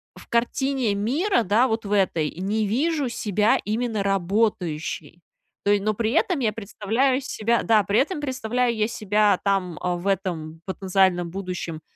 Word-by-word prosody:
в -, -, -14 dB
картине 245 Hz, -1 st, 0 dB
мира, 250 Hz, -, +1 dB
да, 220 Hz, +7 st, +3 dB
вот 225 Hz, -2 st, -2 dB
в 200 Hz, -, -5 dB
этой, 185 Hz, -6 st, +2 dB
не 205 Hz, +4 st, -1 dB
вижу 285 Hz, +4 st, 0 dB
себя 210 Hz, -1 st, +1 dB
именно 220 Hz, 0 st, -1 dB
работающей. 175 Hz, -5 st, -1 dB, 0.4 s
То 205 Hz, -, +4 dB
е 205 Hz, -1 st, +3 dB
но 215 Hz, +1 st, 0 dB
при 225 Hz, 0 st, 0 dB
этом 335 Hz, +1 st, +1 dB
я 220 Hz, -4 st, +1 dB
представляю 230 Hz, +5 st, 0 dB
себя 235 Hz, -2 st, 0 dB
Да, 215 Hz, -2 st, +4 dB
при 200 Hz, +4 st, +2 dB
этом 295 Hz, +2 st, 0 dB
представляю 250 Hz, -3 st, -1 dB
я 215 Hz, 0 st, +1 dB
себя 210 Hz, -3 st, +2 dB
там, 190 Hz, -5 st, 0 dB
а, 180 Hz, -1 st, 0 dB
в 175 Hz, +2 st, -7 dB
этом 170 Hz, -5 st, -2 dB
потенциальном 185 Hz, -2 st, +1 dB
будущем, 180 Hz, -4 st, -5 dB
210 Hz, 160 wpm, -24 LUFS, 190-235 Hz, 0.4 s, То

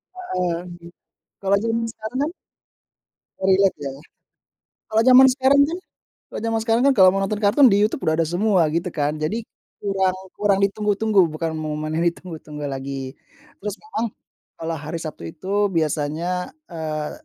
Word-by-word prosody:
Heeh, 180 Hz, -, -2 dB, 0.9 s
kalau 200 Hz, 0 st, +2 dB
jaman 230 Hz, 0 st, 0 dB
sekarang 220 Hz, +4 st, -6 dB
kan 305 Hz, -, 0 dB, 1.2 s
relate, 190 Hz, 0 st, +4 dB
ya? 140 Hz, -1 st, -3 dB, 1.0 s
Kalau 220 Hz, +1 st, +3 dB
jaman 260 Hz, +1 st, +9 dB
sekarang 270 Hz, +2 st, +4 dB
kan 340 Hz, +2 st, -3 dB, 0.5 s
kalau -, -, -5 dB
jaman 225 Hz, 0 st, 0 dB
sekarang 225 Hz, +2 st, +2 dB
kan, 275 Hz, -, +5 dB
kalau 185 Hz, -2 st, +7 dB
mau 195 Hz, -, -1 dB
nonton 205 Hz, +2 st, -2 dB
kartun 255 Hz, +7 st, +6 dB
di 205 Hz, -2 st, +4 dB
YouTube 215 Hz, -, 0 dB
udah 160 Hz, -, +3 dB
ada 165 Hz, -, +2 dB
semua, 185 Hz, +2 st, +2 dB
gitu 170 Hz, +3 st, -1 dB
kan. 150 Hz, 0 st, -1 dB
Jadi, 210 Hz, +10 st, -2 dB, 0.4 s
kurang 190 Hz, -2 st, +1 dB, 0.2 s
kurang 200 Hz, -2 st, +2 dB
ditunggu-tunggu, 205 Hz, -1 st, +2 dB
bukan 160 Hz, +1 st, -3 dB
momen 155 Hz, 0 st, -3 dB
yang 170 Hz, -, +1 dB
ditunggu-tunggu 155 Hz, -4 st, -4 dB
lagi. 135 Hz, 0 st, -5 dB, 0.4 s
Terus, 205 Hz, 0 st, -4 dB
memang 430 Hz, -, -3 dB, 0.5 s
kalau 165 Hz, 0 st, -4 dB
hari 155 Hz, +3 st, -5 dB
Sabtu 150 Hz, -, -7 dB
itu 200 Hz, -, -1 dB
biasanya, 160 Hz, -, -1 dB, 0.2 s
eee, 155 Hz, -2 st, -4 dB
190 Hz, 150 wpm, -22 LUFS, 155-215 Hz, 1.2 s, jaman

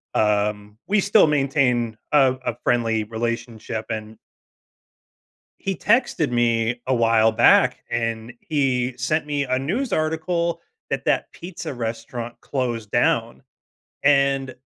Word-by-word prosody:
um 105 Hz, 0 st, 0 dB
We 210 Hz, +1 st, +2 dB
still 200 Hz, -1 st, +5 dB
maintain 135 Hz, -6 st, +1 dB
a 135 Hz, -3 st, +4 dB
a 120 Hz, -, -1 dB
friendly 115 Hz, -3 st, +1 dB
relationship, 115 Hz, 0 st, -4 dB
and 110 Hz, 0 st, -6 dB, 1.4 s
he 195 Hz, -1 st, -2 dB
texted 210 Hz, -, +1 dB
me 120 Hz, 0 st, +1 dB
a 130 Hz, -, +2 dB
while 115 Hz, -2 st, +3 dB
back, 110 Hz, -, +4 dB
and 115 Hz, 0 st, -2 dB
he 130 Hz, -4 st, 0 dB
sent 150 Hz, +5 st, -1 dB
me 145 Hz, -1 st, -1 dB
a 130 Hz, -1 st, 0 dB
news 210 Hz, -, -2 dB
article 170 Hz, +2 st, -1 dB, 0.3 s
that 135 Hz, -1 st, -2 dB
that -, -, 0 dB
pizza 170 Hz, -2 st, -7 dB
restaurant 115 Hz, 0 st, -5 dB
closed 120 Hz, -6 st, -3 dB
down, -, -, +1 dB, 0.6 s
and 140 Hz, -2 st, +2 dB
125 Hz, 120 wpm, -22 LUFS, 115-150 Hz, 1.4 s, still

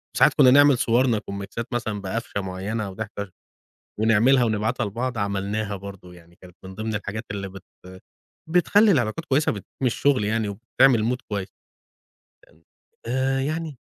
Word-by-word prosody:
وساعات -, -, +5 dB
كُنّا 130 Hz, -3 st, +6 dB
نعمل 145 Hz, 0 st, +6 dB
صورنا 120 Hz, -1 st, +2 dB
كُوميكْسات 100 Hz, +4 st, -6 dB
مثلًا 110 Hz, -4 st, -2 dB
بقفشة 100 Hz, +1 st, -4 dB
معينة 100 Hz, +3 st, -4 dB
وضحكة، 100 Hz, -1 st, -6 dB, 0.7 s
ونعملها 115 Hz, +4 st, +4 dB
ونبعتها 110 Hz, 0 st, -1 dB
لبعض 120 Hz, +4 st, -3 dB
عملناها 100 Hz, +1 st, -2 dB
برضه 95 Hz, -2 st, -10 dB
يعني 85 Hz, 0 st, -18 dB
كانت 90 Hz, -1 st, -15 dB
من 95 Hz, 0 st, -9 dB
ضمن 110 Hz, +2 st, -4 dB
الحاجات 105 Hz, +1 st, -4 dB
اللي 100 Hz, -1 st, -4 dB
بت 95 Hz, -1 st, -11 dB, 0.9 s
بتخلّي 200 Hz, +5 st, +4 dB
العلاقات 125 Hz, +1 st, 0 dB
كويسة 145 Hz, -1 st, +1 dB
وبتدعّم 100 Hz, -3 st, -8 dB, 0.2 s
الشغل 130 Hz, -1 st, +2 dB
يعني 110 Hz, +1 st, 0 dB
وبتعمل 115 Hz, +2 st, +2 dB
mood 125 Hz, -, -23 dB
كويس. 100 Hz, -2 st, -3 dB, 1.6 s
آآ 130 Hz, +2 st, 0 dB
يعني. 155 Hz, 0 st, -3 dB
110 Hz, 140 wpm, -24 LUFS, 100-125 Hz, 1.6 s, كُنّا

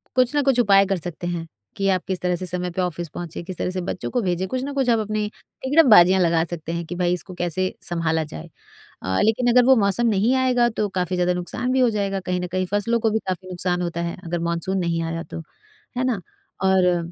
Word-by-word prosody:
कुछ 255 Hz, +2 st, +3 dB
ना 290 Hz, -, +4 dB
कुछ 265 Hz, -3 st, +2 dB
उपाय 200 Hz, -3 st, +5 dB
कर 195 Hz, -1 st, 0 dB
सकते 175 Hz, 0 st, -6 dB
हैं, 170 Hz, -2 st, -3 dB, 0.3 s
कि 195 Hz, 0 st, -1 dB
आप 185 Hz, -2 st, +1 dB
किस 190 Hz, -2 st, -2 dB
तरह 180 Hz, 0 st, +1 dB
से 185 Hz, -, -5 dB
समय 180 Hz, 0 st, -2 dB
पे 185 Hz, -, -2 dB
ऑफिस 175 Hz, -2 st, -3 dB
पहुँचे, 170 Hz, +1 st, -7 dB
किस 185 Hz, 0 st, -7 dB
तरह -, -, -1 dB
से 185 Hz, -1 st, -3 dB
बच्चों 180 Hz, -, -4 dB
को 245 Hz, -, 0 dB
भेजें, 185 Hz, 0 st, -1 dB
कुछ 255 Hz, +5 st, -3 dB
ना 285 Hz, 0 st, -4 dB
कुछ 265 Hz, -3 st, 0 dB
आप 230 Hz, -1 st, +4 dB
अपनी 215 Hz, 0 st, -1 dB, 0.4 s
तिकड़म-बाज़ियाँ 220 Hz, -, +6 dB
लगा 165 Hz, -1 st, +3 dB
सकते 165 Hz, -1 st, -6 dB
हैं, 170 Hz, 0 st, -3 dB
कि 175 Hz, -, -6 dB
भई 175 Hz, 0 st, +1 dB
इसको 180 Hz, +2 st, -5 dB
कैसे 175 Hz, +1 st, -1 dB, 0.2 s
सँभाला 160 Hz, -2 st, 0 dB
जाए। 80 Hz, -, -9 dB, 0.5 s
अ, 95 Hz, 0 st, -1 dB
लेकिन 240 Hz, +3 st, +2 dB
अगर 250 Hz, 0 st, +6 dB
वो 265 Hz, -1 st, +7 dB
मौसम 205 Hz, +3 st, +2 dB
नहीं 220 Hz, +5 st, +2 dB
आएगा, 250 Hz, -2 st, +3 dB
तो 215 Hz, -2 st, -2 dB
काफ़ी 180 Hz, -1 st, -2 dB
ज़्यादा 180 Hz, 0 st, +1 dB
नुकसान 180 Hz, +8 st, -3 dB
भी 260 Hz, -, +2 dB
हो 245 Hz, -2 st, +4 dB
जाएगा, 200 Hz, -2 st, -1 dB
कहीं 180 Hz, -1 st, -2 dB
न 180 Hz, -, -3 dB
कहीं 185 Hz, 0 st, 0 dB
फसलों 230 Hz, +3 st, +1 dB
को 225 Hz, -1 st, +2 dB
भी 220 Hz, -, +1 dB
काफ़ी 185 Hz, 0 st, -3 dB
नुकसान 180 Hz, 0 st, -2 dB
होता 170 Hz, -1 st, -3 dB
है, 170 Hz, 0 st, -3 dB
अगर 170 Hz, +1 st, -2 dB
मानसून 185 Hz, +3 st, -1 dB
नहीं 170 Hz, -2 st, -1 dB
आया 165 Hz, 0 st, -3 dB
तो, 165 Hz, -, -8 dB, 0.6 s
है 255 Hz, -, +1 dB
ना? 235 Hz, -7 st, 0 dB, 0.4 s
और 180 Hz, -3 st, +2 dB
185 Hz, 240 wpm, -22 LUFS, 175-220 Hz, 0.6 s, वो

